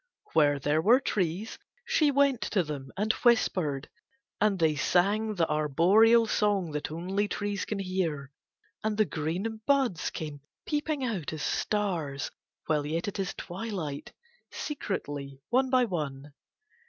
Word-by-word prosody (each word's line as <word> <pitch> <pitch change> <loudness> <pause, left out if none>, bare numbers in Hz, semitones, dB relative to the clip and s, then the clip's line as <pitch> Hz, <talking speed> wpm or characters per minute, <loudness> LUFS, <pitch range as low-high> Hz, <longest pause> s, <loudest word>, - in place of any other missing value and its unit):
Where 145 -3 +4
there 145 +3 +1
were 235 +8 +6
trees 195 -3 -2 0.3
she 305 -2 +3
went 280 -3 +3
to 190 -4 +2
them 140 -4 -6
and 215 +2 +2
whispered, 180 - +2 0.5
and 210 -2 +3
they 160 -3 +2
sang 205 +8 +2
the 165 -3 +2
arboreal 180 +11 +4
song 205 -6 +1
that 150 0 -3
only 185 +6 -1
trees 205 -1 -2
can 210 - -3
hear, 175 -8 -2 0.5
and 215 -1 -1
the 215 - +4
green 185 +8 -3
buds 265 -11 +2
came 150 -3 -6 0.2
peeping 295 -2 -1
out 190 - -3
as 155 - -4
stars 170 -10 -1 0.3
while 150 -2 +1
yet 160 +5 -2
it 200 - -4
is 195 -1 -2
twilight, 180 -6 -5 0.4
secretly 145 - -4
one 260 +2 +3
by 255 -1 +4
one. 145 - -4
185 Hz, 140 wpm, -29 LUFS, 150-220 Hz, 0.5 s, were